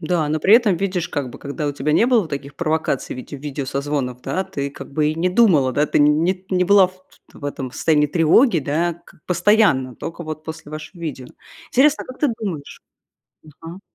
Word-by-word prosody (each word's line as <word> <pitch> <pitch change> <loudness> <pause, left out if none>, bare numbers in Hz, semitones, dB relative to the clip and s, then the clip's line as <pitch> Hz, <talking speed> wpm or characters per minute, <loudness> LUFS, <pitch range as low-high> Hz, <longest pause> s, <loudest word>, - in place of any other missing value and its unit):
Да, 170 -4 0
но 155 +1 0
при 195 +8 +5
этом 220 -6 +4
видишь, 180 -2 -2
как 145 -6 -3
бы, - - -11
когда 145 +2 -5
у 145 - -1
тебя 145 +1 -2
не 230 - +4
было 230 -9 +2
таких 140 -1 -6
провокаций, 160 -4 -1
в - - -8
виде 140 +3 -8
видео 140 0 -5
созвонов, 135 -2 -3
да, 190 - -2
ты 140 -4 -4
как 140 0 -11
бы 150 +1 +1
и 155 - -1
не 175 +3 +1
думала, 180 - +4
да, 150 +3 +1
ты - - +1
не 165 +6 +2
не 180 -1 +2
была 195 0 +6
в 185 0 -17 0.3
в - - -12
этом 140 -2 -4
состоянии 150 0 +2
тревоги, 170 - +4
да, 165 +5 -1
к - - -19
постоянно, 180 - +2
только 170 +1 -7
вот 155 0 -7
после 160 -2 -8
вашего 155 +4 -9
видео. 135 -6 -5 0.4
Интересно, 285 +3 +3
как 255 - -11
ты 295 - +3
думаешь? 165 -10 -6 0.6
Мгм. 165 +4 -12
155 Hz, 205 wpm, -20 LUFS, 145-185 Hz, 0.6 s, была